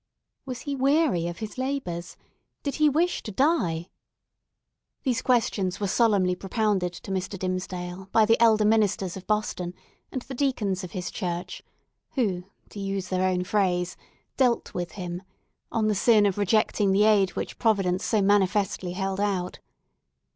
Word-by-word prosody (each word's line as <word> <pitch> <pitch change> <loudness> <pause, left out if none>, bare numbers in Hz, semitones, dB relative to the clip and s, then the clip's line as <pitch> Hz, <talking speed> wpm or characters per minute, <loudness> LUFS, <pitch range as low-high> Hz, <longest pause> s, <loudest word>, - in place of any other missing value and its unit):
Was 255 -2 -5
he 285 -1 -3
weary 270 - +2
of 175 0 -5
his 220 +3 -6
labours? 255 -11 -3 0.5
Did 280 - -2
he 305 -1 +5
wish 335 +5 +1
to 215 - -7
die? 190 - +1 1.1
These 255 -3 0
questions 210 -7 +1
were 205 - -1
solemnly 200 -3 +3
propounded 195 -1 0
to 185 - -8
Mr. 190 +1 -2
Dimmesdale 185 0 -4
by 220 -1 +5
the 225 +2 +3
elder 220 -2 +5
ministers 210 -4 +2
of 190 - -9
Boston, 185 -4 -1 0.4
and 260 - -4
the 265 - -8
deacons 220 -9 0
of 180 - -8
his 180 -2 -4
church, 180 -1 -4 0.5
who, 190 -9 0 0.2
to 205 - -9
use 195 -1 -3
their 185 0 +1
own 180 -1 0
phrase, 180 -3 0 0.4
"dealt 250 -3 +2
with 175 -1 -4
him," 180 -2 -5 0.5
on 220 -2 +1
the 215 - +2
sin 210 +1 +4
of 200 0 0
rejecting 205 0 +2
the 200 +2 +4
aid 205 -3 +4
which - - -5
Providence 195 -5 +2
so 215 -3 +2
manifestly 195 -2 +1
held 195 +1 -2
out. 190 -3 -1
200 Hz, 155 wpm, -26 LUFS, 180-225 Hz, 1.1 s, he